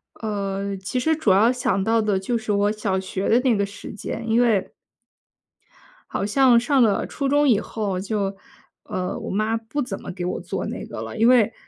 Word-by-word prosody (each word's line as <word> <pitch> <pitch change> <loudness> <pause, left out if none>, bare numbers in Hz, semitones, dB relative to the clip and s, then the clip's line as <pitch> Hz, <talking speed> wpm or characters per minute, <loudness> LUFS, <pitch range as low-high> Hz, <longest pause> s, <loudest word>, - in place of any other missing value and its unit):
呃， 200 -2 -3
其 190 +7 -3
实 320 +5 +2
主 295 -10 +2
要 210 +5 +5
想 245 -6 0
到 225 +2 +2
的 210 -3 +1
就 235 +5 -1
是 220 -1 -3
我 205 0 +2
小 205 -3 -1
学 190 +1 -3
的 235 - +5
那 250 -3 +3
个 200 -1 +1
时 200 +1 -9
间。 215 +2 -6
因 225 +2 +3
为 220 -6 +2 1.4
好 - - -1
像 245 +2 +5
上 265 +3 +2
了 215 -4 +3
初 275 -2 -3
中 290 +1 +3
以 225 -6 +4
后 205 -5 -3
就， 200 0 -2 0.5
呃， 185 0 -3
我 - - -6
妈 215 +3 0
不 225 +5 -5
怎 210 -7 -5
么 - - -6
给 180 -1 -5
我 180 - -2
做 - - -4
那 - - -5
个 - - -8
了。 - - -7
因 225 +1 +3
为 240 -3 +5
215 Hz, 220 characters per minute, -23 LUFS, 195-240 Hz, 1.4 s, 要